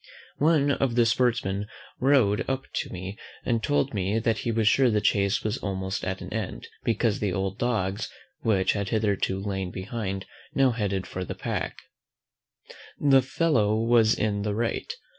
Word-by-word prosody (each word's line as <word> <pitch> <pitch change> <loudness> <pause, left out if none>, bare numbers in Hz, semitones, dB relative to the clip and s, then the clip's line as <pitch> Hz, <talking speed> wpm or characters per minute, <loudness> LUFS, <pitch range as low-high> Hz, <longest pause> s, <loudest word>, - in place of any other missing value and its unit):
One 150 -2 +4
of 135 -3 0
the 120 -1 +5
sportsmen 110 -4 +1 0.3
rode 125 -7 +3
up 135 0 -1
to - - -2
me, 95 +4 -7 0.3
and 115 -2 +1
told 145 0 +1
me 100 +1 0
that 115 0 +1
he 120 - -1
was 110 -1 +1
sure 130 +3 +5
the 105 -2 +2
chace 100 -1 +2
was 110 +2 -1
almost 95 -1 -3
at 95 0 -3
an - - -7
end, - - -4 0.2
because 115 -1 +1
the 105 -3 0
old 95 +1 -2
dogs, 105 -5 -1 0.3
which 95 -4 +2
had 100 -2 -2
hitherto 100 -3 0
lain 95 -2 -3
behind, 95 0 -4 0.3
now 135 -2 +4
headed 100 -5 -1
the 90 -1 -5
pack. - - -3 1.2
The 135 -2 +5
fellow 125 -6 +2
was 115 0 +4
in 105 -1 0
the 105 0 -1
right. 115 - -1
110 Hz, 160 wpm, -26 LUFS, 95-120 Hz, 1.2 s, the